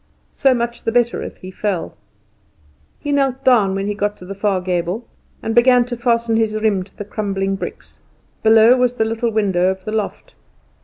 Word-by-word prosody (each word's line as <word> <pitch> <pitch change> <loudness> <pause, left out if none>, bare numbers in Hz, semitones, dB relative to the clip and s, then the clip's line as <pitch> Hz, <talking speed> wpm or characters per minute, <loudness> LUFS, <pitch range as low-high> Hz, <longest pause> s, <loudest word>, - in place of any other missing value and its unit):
So 270 -3 +3
much 235 0 -3
the 225 - 0
better 240 0 +1
if - - -7
he 185 - -10
fell. 190 -3 -3 1.1
He 290 - -3
knelt 270 -2 0
down 215 -8 +4
when 195 0 -2
he 205 - -1
got 205 0 -2
to 180 - -12
the 195 - -6
far 200 -1 0
gable, 180 +4 -2 0.4
and 225 - -1
began 245 +1 +5
to 245 0 -5
fasten 235 -1 +1
his 220 -1 +1
riem 215 -3 +1
to 190 - -22
the 205 - -6
crumbling 195 -2 -2
bricks. - - -8 0.4
Below 225 +3 +6
was 250 -1 +2
the 220 - +1
little 225 +1 -1
window 195 -5 +1
of 190 0 -4
the 215 - -4
loft. 215 -2 -4
220 Hz, 195 wpm, -19 LUFS, 195-240 Hz, 1.1 s, Below